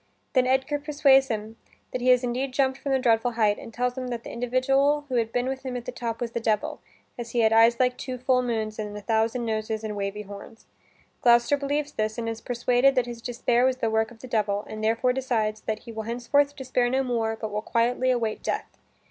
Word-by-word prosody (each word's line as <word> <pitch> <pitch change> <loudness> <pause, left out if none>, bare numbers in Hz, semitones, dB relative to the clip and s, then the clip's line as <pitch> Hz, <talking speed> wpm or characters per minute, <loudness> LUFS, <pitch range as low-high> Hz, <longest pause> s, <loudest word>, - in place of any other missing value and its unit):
Then 255 -2 +3
Edgar 265 +3 +1
persuades 285 -2 +4
him 220 -1 -4 0.3
that 255 - -3
he 250 - -1
has 250 0 +5
indeed 255 +2 -2
jumped 265 -1 +1
from 280 - -3
the 265 - +4
dreadful 240 -1 +2
height 215 -3 +2
and - - -10
tells 245 +2 -1
him 255 -1 -4
that 240 -2 -4
the - - -8
individual 270 +4 +1
who 255 - 0
had 225 -1 0
been 245 +1 0
with 265 0 -4
him 255 -2 -3
at 240 - -7
the - - -4
top 230 -2 -4
was 235 -1 -2
the 235 - -2
devil, 220 -2 -1 0.4
as 235 -1 -6
he 240 - +2
had 220 0 +4
eyes 230 +1 +5
like 250 -1 +1
two 255 -1 -4
full 255 0 +2
moons 220 -3 -2
and 210 -1 -4
a - - -7
thousand 225 +3 0
noses 220 0 -2
and 215 -1 -4
wavy 200 +1 -3
horns. 205 +2 -11 0.6
Gloucester 240 +3 +5
believes 285 +1 -2
this, 215 -3 -2
and 230 -1 -3
is 225 0 -4
persuaded 245 +2 +2
that 250 -2 +2
his 240 -1 -8
despair 240 0 +1
was 260 0 +2
the 225 -3 -1
work 220 0 +1
of 240 - -15
the 255 - -8
devil, 210 -3 0
and 215 0 -7
therefore 230 +3 +2
decides 225 -5 -1
that 215 0 -3
he 235 - -10
will 220 -1 -5
henceforth 280 +4 +1
despair 255 -3 0
no 265 +2 +1
more, 230 -3 -1
but 220 -1 -5
will 210 +1 -2
quietly 245 +3 +1
await 230 -4 0
death. - - -4
240 Hz, 235 wpm, -26 LUFS, 220-255 Hz, 0.6 s, has